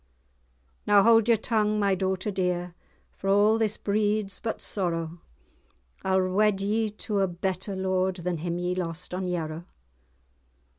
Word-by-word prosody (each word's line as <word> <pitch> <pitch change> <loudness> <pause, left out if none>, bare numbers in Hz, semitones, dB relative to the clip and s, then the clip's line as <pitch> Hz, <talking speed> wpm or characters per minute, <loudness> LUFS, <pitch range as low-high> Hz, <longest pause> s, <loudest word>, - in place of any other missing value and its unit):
"Now 205 -1 +6
haud[#] 225 0 +5
your 230 -1 +5
tongue, 215 -1 0
my 200 -1 +2
daughter 190 +2 -1
dear, 180 -2 -1 0.4
For 195 - -7
a' 205 +3 +4
this 215 -2 0
breeds 210 -1 0
but 225 - -3
sorrow; 170 -3 -3 0.8
I'll 190 -1 +2
wed 205 0 +3
ye 215 +2 0
to 210 0 -3
a 195 - +3
better 190 +2 -3
lord, 190 0 0
Than 180 -1 -3
him 170 +2 -3
ye 180 0 -1
lost 180 -1 -4
on 185 +1 -2
Yarrow." 165 -2 -3
190 Hz, 145 wpm, -27 LUFS, 180-210 Hz, 0.8 s, Now